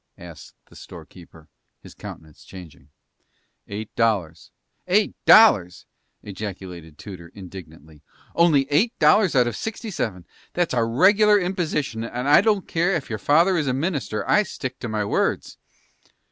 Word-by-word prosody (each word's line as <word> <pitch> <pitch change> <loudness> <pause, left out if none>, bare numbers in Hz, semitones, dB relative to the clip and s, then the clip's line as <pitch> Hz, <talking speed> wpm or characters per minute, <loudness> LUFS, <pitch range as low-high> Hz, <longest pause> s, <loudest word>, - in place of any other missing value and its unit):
asked 85 -2 -13
the - - -21
storekeeper, 80 -3 -14 0.3
his - - -15
countenance 80 -2 -12
changing. 85 -6 -14 0.8
"Eight 105 +1 -8
dollars." 100 -9 -1 0.4
"Eight 205 +3 +1
dollars!" 95 - +5 0.4
ejaculated 95 -6 -9
Tudor, 90 -3 -10
indignantly. 80 -6 -13 0.3
"Only 160 -5 +3
eight 210 +11 +1
dollars 205 -7 +3
out 125 -2 +4
of 120 - -3
sixty 220 0 -6
seven! 95 - -4 0.3
That's 175 -4 -1
a 120 -2 +1
regular 200 - +4
imposition, 165 - -3
and 125 +3 -5
I 145 - +6
don't 205 -3 0
care 175 +3 0
ef 140 -7 -5
your 110 - -4
father 170 - +3
is 150 -3 -1
a 130 - 0
minister, 140 - -3
I 210 - +4
stick 140 -9 -7
to 120 - -6
my 105 -1 -2
words." - - -2
120 Hz, 145 wpm, -22 LUFS, -, 0.8 s, I